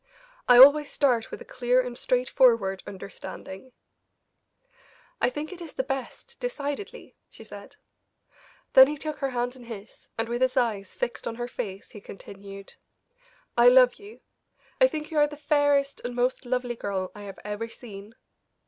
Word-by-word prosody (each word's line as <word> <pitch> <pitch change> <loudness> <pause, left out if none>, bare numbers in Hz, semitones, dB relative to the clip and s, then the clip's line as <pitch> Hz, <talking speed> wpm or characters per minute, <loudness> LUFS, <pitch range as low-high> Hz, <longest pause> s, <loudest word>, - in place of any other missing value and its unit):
I 245 - +7
always 285 +3 +8
start 245 -6 +1
with - - -8
a - - -10
clear 250 0 +1
and 250 -1 -2
straightforward 240 -6 +2
understanding." 195 +3 -9 1.5
"I - - +3
think 295 +7 -6
it 355 - -11
is 330 -3 -8
the 265 - -2
best, 270 - -6
decidedly," 345 - -5
she - - -14
said. - - -12 1.0
Then 265 0 +9
he 300 +1 -4
took 305 0 -5
her 275 - -1
hands 245 0 -2
in 250 -2 -13
his, 220 -3 -11
and 225 0 0
with 240 +1 -3
his 255 0 +1
eyes 210 -6 -1
fixed 240 - -4
on 230 - -4
her 240 +1 -4
face, 200 -6 -7
he 210 - -11
continued: 195 0 -11 0.8
"I - - +6
love - - +6
you; 415 +2 -14 0.6
I - - +8
think 310 -8 -6
you 310 - +1
are 295 - +5
the 295 0 -10
fairest 290 -1 +1
and 245 0 -5
most 250 +2 0
lovely 250 -1 -1
girl 190 -4 -4
I 210 - -11
have 195 -1 -9
ever 210 +2 -4
seen. 215 -2 -12
250 Hz, 165 wpm, -26 LUFS, 220-290 Hz, 1.5 s, Then